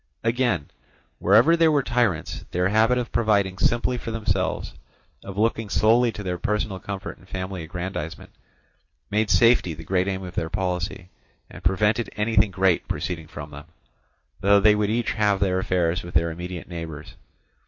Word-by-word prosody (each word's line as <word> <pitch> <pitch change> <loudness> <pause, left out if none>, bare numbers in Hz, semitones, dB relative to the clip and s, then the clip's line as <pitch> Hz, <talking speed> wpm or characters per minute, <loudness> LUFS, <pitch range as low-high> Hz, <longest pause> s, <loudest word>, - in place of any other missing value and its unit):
Again, 115 - 0 0.5
wherever 115 - +5
there 165 -1 +4
were 145 -2 +2
tyrants, 115 -10 -1
their 90 +1 0
habit 110 +4 +3
of 120 -1 -3
providing 100 -5 +1
simply 120 +1 +1
for 115 - -6
themselves, 95 -5 -1 0.5
of 95 0 -8
looking 110 0 0
solely 115 +4 +3
to 105 - -7
their 90 -2 -3
personal 105 -2 -1
comfort 100 +1 -6
and 95 - -20
family 95 -1 -4
aggrandizement, 85 -1 -6 0.8
made 105 0 +1
safety 115 -9 +4
the 80 - -10
great 90 +3 0
aim 95 -1 -2
of 90 -1 -7
their 80 - -2
policy, 90 0 -3 0.4
and - - -11
prevented 105 +5 +1
anything 105 -1 +2
great 95 -1 +1
proceeding 80 +1 -4
from 75 -1 -9
them; 75 0 -10 0.7
though 100 +1 +5
they 105 +1 +6
would 105 -1 0
each 115 +2 0
have 105 -3 +1
their 95 -2 +1
affairs 90 -1 0
with 85 -1 -10
their 85 +1 +2
immediate 90 +1 -7
neighbours. 80 -4 -7
95 Hz, 165 wpm, -24 LUFS, 90-110 Hz, 0.8 s, they